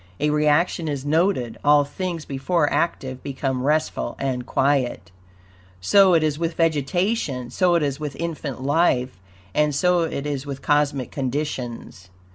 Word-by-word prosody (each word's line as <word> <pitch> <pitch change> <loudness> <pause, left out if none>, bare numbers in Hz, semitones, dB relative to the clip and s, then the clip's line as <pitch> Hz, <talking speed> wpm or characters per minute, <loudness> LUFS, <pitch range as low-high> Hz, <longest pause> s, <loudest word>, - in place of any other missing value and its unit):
A 150 - +1
reaction 150 +3 +2
is 140 -2 -3
noted; 155 - +1
all 145 0 +5
things 170 +1 -5
before 145 +4 0
active 130 -6 -1
become 135 -2 -3
restful 145 - 0
and 130 -2 -3
quiet. 130 -10 0 0.7
So 190 - +5
it 160 - +3
is 150 -1 0
with 165 -1 -2
vegetation, 160 - 0
so 180 -2 +2
it 165 - +2
is 140 0 -2
with 150 -3 -5
infant 150 -6 -5
life, 135 - +1 0.3
and 150 -1 +1
so 180 +3 +3
it 155 -4 -3
is 140 -3 -3
with 140 -2 -7
cosmic 145 -3 +1
conditions. 125 -8 -4
145 Hz, 145 wpm, -23 LUFS, 130-165 Hz, 0.7 s, all